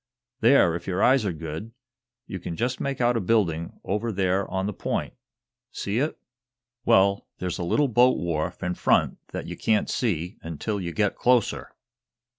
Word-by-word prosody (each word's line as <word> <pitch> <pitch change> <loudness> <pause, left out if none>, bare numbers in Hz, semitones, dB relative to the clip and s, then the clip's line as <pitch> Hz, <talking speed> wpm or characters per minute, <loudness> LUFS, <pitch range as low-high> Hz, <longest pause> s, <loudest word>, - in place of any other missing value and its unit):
"There, 115 -7 +5
if 85 - -7
yer 95 0 0
eyes 130 -3 +4
are - - 0
good, 80 +7 -6 0.5
you 95 - -6
can 85 -1 -5
jest 125 +6 -1
make 140 -1 -2
out 120 0 +3
a 115 - +1
building 90 -6 0
over 105 +4 -1
there 95 -1 0
on 95 0 -1
the 105 - -2
point. - - -3 0.6
See 100 +4 -2
it? 150 +4 -1 0.7
Well, 100 -4 +3
there's 90 -2 -3
a - - -2
little 145 +12 +2
boat 125 +1 +4
wharf 80 +1 -2
in 90 0 -1
front - - +2
that - - -6
ye - - -6
can't 110 -1 +1
see 90 -6 -2
until 90 +6 -3
you 85 -1 -3
get 105 +3 0
closer." 125 -3 +1
100 Hz, 175 wpm, -25 LUFS, 85-115 Hz, 0.7 s, There